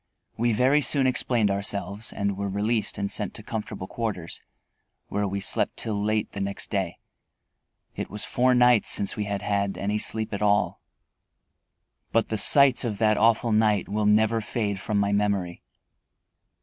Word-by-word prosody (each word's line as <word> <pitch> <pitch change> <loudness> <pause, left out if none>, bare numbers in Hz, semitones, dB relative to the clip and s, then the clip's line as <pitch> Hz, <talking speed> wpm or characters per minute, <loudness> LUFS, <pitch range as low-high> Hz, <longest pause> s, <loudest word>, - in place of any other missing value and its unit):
We 120 +1 +1
very 130 +7 +3
soon 135 +1 +4
explained 120 -4 +1
ourselves 100 +1 -1
and 100 -1 -2
were 100 +1 -3
released 105 +3 -1
and 100 0 -2
sent - - -4
to - - -7
comfortable 105 -4 -5
quarters, 100 -6 -5 0.7
where 105 0 -1
we 100 +1 -3
slept - - -1
till 105 -3 -2
late 105 0 -1
the 100 - -6
next 100 0 -4
day. 95 -5 -2 1.0
It - - -5
was 105 0 -5
four 125 +1 +2
nights 125 -2 +4
since 100 - -1
we 105 - -3
had 100 -1 -4
had 100 -1 -1
any 105 +2 -1
sleep 110 0 -1
at 100 - -4
all. 105 0 +1 1.3
But 115 -1 +1
the 110 - -1
sights 140 +3 +6
of 110 -4 -2
that 110 0 +3
awful 115 +1 +2
night 105 -2 +2
will 105 +1 -1
never 110 +2 +3
fade 105 -2 -3
from 105 +2 -2
my 100 0 +1
memory. 100 -4 -1
105 Hz, 165 wpm, -25 LUFS, 100-115 Hz, 1.3 s, sights